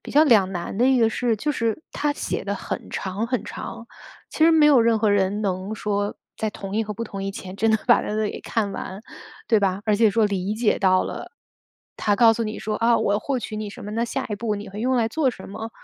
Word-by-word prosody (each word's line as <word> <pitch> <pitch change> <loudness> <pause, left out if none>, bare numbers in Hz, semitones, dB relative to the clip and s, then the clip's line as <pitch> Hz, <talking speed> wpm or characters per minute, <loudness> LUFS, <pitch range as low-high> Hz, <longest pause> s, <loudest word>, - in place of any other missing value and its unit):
比 - - -9
较 300 +2 +6
两 210 -9 +4
难 175 +1 -4
的 245 +4 +3
一 265 -1 +4
个 225 -1 +4
是， 235 +1 0
就 295 +8 -1
是， 230 +1 -1
它 295 0 0
写 - - -4
得 - - -2
很 - - -6
长 195 +4 -3
很 250 0 -1
长。 230 - -7 0.4
其 315 - +2
实 330 - +7
没 315 -2 +6
有 275 -5 +6
任 230 -1 +3
何 215 -1 +2
人 200 +1 +1
能 195 +1 -2
说 205 -1 -2 0.2
在 220 - -2
同 200 -1 -6
意 225 - +1
和 210 - -4
不 220 - -5
同 195 -2 -6
意 195 - -2
前 190 -1 -8
真 225 +2 +2
的 220 - +3
把 - - +6
那 210 - -4
个 215 0 0
给 - - -5
看 210 -3 -1
完， 190 +2 -6 0.5
对 225 -2 +4
吧？ 195 -1 0
而 210 -1 +3
且 220 -1 +4
说 220 0 +3
理 200 0 -2
解 225 -1 +1
到 185 -1 +3
了， - - -7 0.6
它 205 - +1
告 225 +1 +6
诉 230 - -2
你 215 - -4
说： 215 0 -3
“啊， 230 0 +3
我 200 - +1
要 205 - +2
获 265 +4 -2
取 215 -2 -6
你 210 -1 -4
什 - - -10
么， 210 - -6
那 230 +2 0
下 - - -3
一 210 - -2
步 215 -1 -2
你 205 +1 -7
会 205 +2 -7
用 255 +2 +1
来 225 -2 +2
做 280 0 +1
什 190 - -11
么。” 220 +3 -6
215 Hz, 285 characters per minute, -23 LUFS, 200-230 Hz, 0.6 s, 实